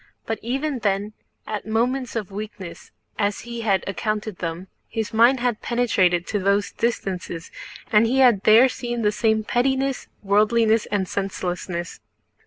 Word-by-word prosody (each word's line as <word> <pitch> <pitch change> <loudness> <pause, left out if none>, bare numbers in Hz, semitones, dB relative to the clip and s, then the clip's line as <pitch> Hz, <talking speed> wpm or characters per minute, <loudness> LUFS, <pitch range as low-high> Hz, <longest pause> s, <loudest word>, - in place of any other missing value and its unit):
But 225 - -3
even 270 +3 -2
then, 205 0 -1 0.3
at 210 -1 -5
moments 245 +3 0
of 210 -3 -3
weakness 195 -4 -8 0.3
as 205 -1 0
he 235 -1 -6
had 200 -4 +1
accounted 215 0 -3
them, 170 +2 -4 0.2
his 220 -1 -3
mind 240 +4 +5
had 240 -3 0
penetrated 185 -8 +1
to 210 - -2
those 200 +1 +1
distances 185 -7 -3 0.4
and 220 +1 +5
he 255 +3 +1
had 245 -7 +5
there 220 +5 +7
seen 240 -2 -4
the 210 - +3
same 220 0 +1
pettiness, 265 +3 0 0.2
worldliness, 215 +2 +3
and 200 -2 -1
senselessness. 180 -3 -4
215 Hz, 145 wpm, -23 LUFS, 195-235 Hz, 0.4 s, there